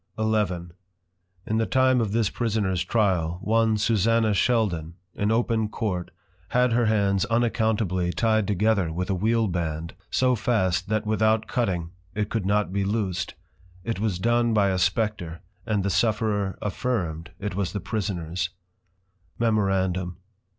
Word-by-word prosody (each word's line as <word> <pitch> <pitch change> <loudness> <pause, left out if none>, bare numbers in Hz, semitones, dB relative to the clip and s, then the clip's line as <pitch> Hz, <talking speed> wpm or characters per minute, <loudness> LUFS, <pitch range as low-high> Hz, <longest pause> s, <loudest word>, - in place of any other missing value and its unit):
XI. 110 -1 +2 1.0
In 110 - 0
the 115 - +1
time 130 -1 +3
of 110 -3 -1
this 110 -1 +1
prisoners 105 -6 0
Trial, 90 -7 +1
one 110 0 +2
Susanna 110 +1 +2
Sheldon, 95 -8 +1 0.2
in 100 - -1
open 115 -2 +1
Court 95 -6 -3 0.4
had 125 +3 +2
her 120 -1 +3
hands 100 -3 +2
Unaccountably 110 -6 +1
ty'd 110 0 +1
together 105 -3 +1
with 90 +4 -2
a - - +2
Wheel 110 +4 +1
band, 85 -2 -3 0.2
so 130 0 +2
fast 95 -6 0
that 110 0 0
without 110 +1 +2
cutting, 95 -9 -1 0.2
it 105 0 -2
could 105 -5 -1
not 105 -2 +1
be 100 0 +1
loosed: 95 -4 -2 0.5
It 115 -1 -3
was 105 -4 0
done 120 +3 +2
by 100 -2 +4
a 95 -1 0
Spectre; 90 -3 -1 0.3
and 105 -3 +1
the 100 - 0
Sufferer 105 0 +1
affirm'd, 90 -7 -2
it 105 -1 -4
was 95 -1 -1
the 100 - -3
Prisoners. 90 -4 -2 0.9
_Memorandum. 95 -5 +1
105 Hz, 145 wpm, -25 LUFS, 95-110 Hz, 1.0 s, by